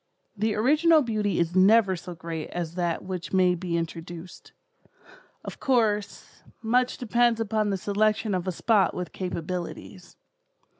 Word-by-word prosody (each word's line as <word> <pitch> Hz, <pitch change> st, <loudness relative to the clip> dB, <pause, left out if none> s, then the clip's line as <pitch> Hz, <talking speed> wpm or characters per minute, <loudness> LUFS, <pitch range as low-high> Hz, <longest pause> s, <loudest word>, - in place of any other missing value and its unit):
The 215 Hz, +1 st, 0 dB
original 305 Hz, +7 st, +4 dB
beauty 215 Hz, -4 st, -1 dB
is 170 Hz, +1 st, 0 dB
never 195 Hz, +1 st, +5 dB
so 175 Hz, 0 st, -8 dB
great 165 Hz, -1 st, -6 dB
as 170 Hz, -2 st, -4 dB
that 175 Hz, -2 st, -2 dB
which 185 Hz, -1 st, -6 dB
may 185 Hz, -1 st, +4 dB
be 175 Hz, -1 st, -2 dB
introduced. 165 Hz, +1 st, -7 dB, 0.9 s
Of -, -, -8 dB
course, 220 Hz, -6 st, -1 dB, 0.2 s
much 250 Hz, +3 st, +1 dB
depends 240 Hz, -1 st, +2 dB
upon 215 Hz, -1 st, 0 dB
the 195 Hz, -, 0 dB
selection 215 Hz, +2 st, 0 dB
of 185 Hz, 0 st, -2 dB
a -, -, +1 dB
spot 200 Hz, 0 st, +2 dB
with 180 Hz, -2 st, -5 dB
capabilities. 180 Hz, +1 st, -6 dB
190 Hz, 140 wpm, -26 LUFS, 175-220 Hz, 0.9 s, never